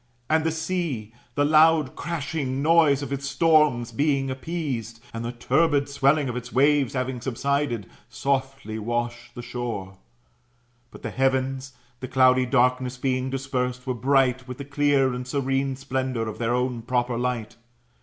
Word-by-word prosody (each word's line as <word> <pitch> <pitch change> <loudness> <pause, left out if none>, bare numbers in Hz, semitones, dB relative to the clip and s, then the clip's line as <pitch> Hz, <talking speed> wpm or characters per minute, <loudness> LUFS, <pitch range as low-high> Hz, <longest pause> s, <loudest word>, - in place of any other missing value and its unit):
And 160 0 +3
the 160 - +1
sea, 160 - -3 0.2
the 145 - +3
loud 155 -2 +4
crashing 150 -4 -3
noise 155 -3 +4
of 140 0 -4
its 140 0 -3
storms 145 -5 +3
being 135 +1 +1
appeased, 130 -5 -4
and 115 0 -4
the 120 - -3
turbid 140 +4 +2
swelling 140 +1 +2
of 125 - -3
its 125 0 -6
waves 140 -1 +3
having 130 -1 -2
subsided, 135 -2 -1 0.2
softly 135 -5 -2
washed 120 +2 -3
the 120 - -7
shore. 100 -7 -5 0.9
But - - -14
the - - -4
heavens, 130 0 0 0.3
the 130 - -5
cloudy 130 -1 +4
darkness 125 0 +2
being 130 0 -1
dispersed, 125 -1 -2
were 130 - -1
bright 130 +1 +2
with 125 0 -7
the 140 - -7
clear 145 -2 +2
and 125 0 -5
serene 135 0 0
splendour 130 -3 -2
of 110 - -6
their 120 +1 +1
own 125 -1 -1
proper 125 0 0
light. 120 -2 -3
130 Hz, 155 wpm, -25 LUFS, 125-140 Hz, 0.9 s, loud